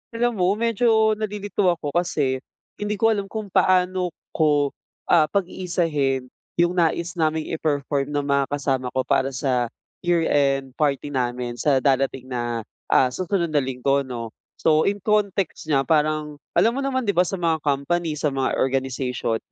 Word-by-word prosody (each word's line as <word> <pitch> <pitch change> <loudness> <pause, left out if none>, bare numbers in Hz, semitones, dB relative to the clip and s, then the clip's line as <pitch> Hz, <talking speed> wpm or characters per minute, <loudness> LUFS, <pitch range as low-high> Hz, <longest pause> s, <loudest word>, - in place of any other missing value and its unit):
Alam 235 -2 0
mo, 185 +2 +3
medyo 225 -1 +3
nalilito 205 -2 -1
ako 165 -5 0
kasi 145 -5 0 0.4
hindi 210 0 -1
ko 225 +2 +3
alam 200 -2 -1
kung 215 -2 -6
paano 185 -1 +2 0.2
ko, 145 -3 +2 0.4
ah, 160 -3 +6
pag-iisahin 165 -9 -1 0.2
yung 175 0 +3
nais 170 +1 +1
naming 155 0 0
i-perform 145 -3 -1
ng 145 - +1
mga 140 -1 +2
kasama 135 -3 -1
ko 130 - +2
para 130 +1 +1
sa 125 -2 0 0.3
year 175 -2 +1
end 135 -2 +2
party 145 -1 0
namin 125 -2 -2
sa 135 -3 +2
darating 135 -2 +1
na, 120 -2 -2 0.2
ah, 130 -1 +4
susunod 175 +1 -1
na 150 - +3
Linggo 135 +1 0
'no. 120 -4 -5 0.3
So 155 +3 +3
yung 200 - -2
context 200 -6 0
niya 135 -2 +2
parang, 150 -2 0 0.2
alam 230 - +4
mo 275 - -2
naman 260 -2 -1
'di 200 - +1
ba 175 - +4
sa 195 - -3
mga 165 -3 0
company, 150 +3 0
sa 145 -1 0
mga 135 -1 0
organization, 130 -3 -1
155 Hz, 160 wpm, -23 LUFS, 135-185 Hz, 0.4 s, ah